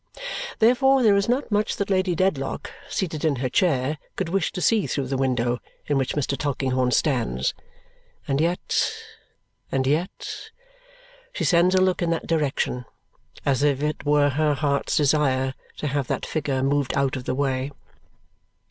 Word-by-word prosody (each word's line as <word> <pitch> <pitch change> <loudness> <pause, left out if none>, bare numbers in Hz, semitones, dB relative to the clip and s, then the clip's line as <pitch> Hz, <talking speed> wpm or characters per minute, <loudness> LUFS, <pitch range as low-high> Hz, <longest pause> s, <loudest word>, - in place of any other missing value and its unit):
Therefore 260 +3 +4
there 210 -3 +6
is 200 +2 +1
not 255 0 0
much 210 +1 +1
that 200 0 -2
Lady 185 -2 +2
Dedlock, 155 -7 -1 0.2
seated 165 -5 -2
in 155 -3 +2
her 130 0 -2
chair, 145 -3 +1 0.2
could 185 -3 -2
wish 190 -1 0
to - - -4
see 215 +2 +2
through 140 - -1
the 135 +1 -2
window 125 -2 0 0.3
in 145 - 0
which 135 -2 0
Mr. 140 -1 0
Tulkinghorn 130 -2 0
stands. 120 - +1 0.7
And 140 +2 +1
yet 170 +2 0 0.8
and 130 -1 +1
yet 155 +7 -2 0.8
she - - -3
sends 180 +1 +4
a 185 - +4
look 185 -1 +2
in 170 - +1
that 165 - -1
direction 145 -5 -1 0.6
as 135 -1 +2
if 145 -1 +2
it 150 -1 -2
were 145 0 +3
her 150 +1 +1
heart's 140 0 0
desire 135 -3 +2 0.2
to - - -5
have 140 -2 -1
that - - -2
figure 140 -4 -1
moved 140 -1 +1
out 140 -1 +1
of 130 -1 -6
the 125 - -1
way. 135 0 -1
145 Hz, 165 wpm, -24 LUFS, 135-175 Hz, 0.8 s, there